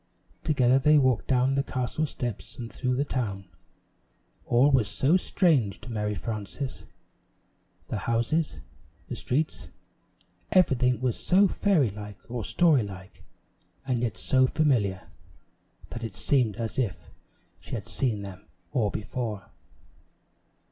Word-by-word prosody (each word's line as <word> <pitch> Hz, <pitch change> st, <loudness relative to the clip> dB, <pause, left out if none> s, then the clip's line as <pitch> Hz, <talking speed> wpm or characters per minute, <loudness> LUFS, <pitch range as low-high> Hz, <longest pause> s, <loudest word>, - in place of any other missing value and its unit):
Together 130 Hz, -3 st, +3 dB
they 150 Hz, +3 st, +5 dB
walked 130 Hz, -4 st, +2 dB
down 130 Hz, 0 st, +3 dB
the 140 Hz, -, +2 dB
castle 135 Hz, +3 st, -2 dB
steps 120 Hz, -6 st, -5 dB
and 115 Hz, -2 st, -7 dB
through 125 Hz, 0 st, -1 dB
the 140 Hz, +3 st, 0 dB
town. 100 Hz, -9 st, -3 dB, 1.0 s
All 125 Hz, +5 st, +4 dB
was 130 Hz, -6 st, +3 dB
so 130 Hz, -, +2 dB
strange 150 Hz, -, +2 dB
to 125 Hz, -, -9 dB
Mary 105 Hz, -1 st, -1 dB
Frances; 115 Hz, +5 st, -5 dB, 1.0 s
the -, -, -3 dB
houses, 120 Hz, +8 st, 0 dB, 0.5 s
the -, -, -3 dB
streets 150 Hz, +5 st, -2 dB, 0.8 s
everything 125 Hz, -, +3 dB
was 125 Hz, -3 st, 0 dB
so 195 Hz, +3 st, +4 dB
fairy 170 Hz, -, +2 dB
like 105 Hz, 0 st, -8 dB
or 120 Hz, -2 st, -3 dB
story 160 Hz, -, +4 dB
like, 95 Hz, -2 st, -9 dB, 0.6 s
and 125 Hz, -3 st, 0 dB
yet 115 Hz, -7 st, -2 dB
so 130 Hz, +7 st, +3 dB
familiar, 120 Hz, -12 st, +1 dB, 0.8 s
that 120 Hz, -, -6 dB
it 110 Hz, -4 st, -5 dB
seemed 120 Hz, -6 st, +1 dB
as 115 Hz, +3 st, -3 dB
if 100 Hz, -10 st, -3 dB, 0.5 s
she -, -, -6 dB
had -, -, -5 dB
seen 110 Hz, -6 st, -1 dB
them 95 Hz, -2 st, -10 dB, 0.2 s
all 110 Hz, -5 st, +1 dB
before. 105 Hz, -1 st, -4 dB
125 Hz, 130 wpm, -27 LUFS, 105-135 Hz, 1.0 s, they